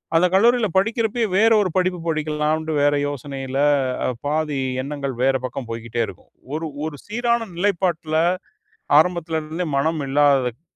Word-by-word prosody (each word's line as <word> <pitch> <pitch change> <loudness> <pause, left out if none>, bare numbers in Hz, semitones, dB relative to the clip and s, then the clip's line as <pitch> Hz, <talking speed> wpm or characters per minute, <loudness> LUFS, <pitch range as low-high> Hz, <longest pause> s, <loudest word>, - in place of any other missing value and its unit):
அந்த 165 +2 +5
கல்லூரியில 230 +3 +4
படிக்கிறப்பயே, 225 +3 +1
வேற 225 +3 +5
ஒரு 190 - 0
படிப்பு 185 -1 +1
படிக்கலாம்ட்டு 155 0 -1
வேற 145 0 +3
யோசனையில, 135 -1 -5 0.5
அ - - +1 0.2
பாதி 150 -1 -1 0.2
எண்ணங்கள் 140 -2 -4
வேற 135 0 +3
பக்கம் 130 0 -5
போய்க்கிட்டே 115 0 -3
இருக்கும். - - -12 0.3
ஒரு 160 +1 -3 0.2
ஒரு 155 -2 -5
சீரான 235 +1 0
நிலைப்பாட்டுல, 175 -4 0 0.8
ஆரம்பத்துல 170 -1 -1
இருந்தே 160 +3 -4
மனம் 155 +3 +1
இல்லாததுக் 135 -3 +2
155 Hz, 135 wpm, -22 LUFS, 140-185 Hz, 0.8 s, அந்த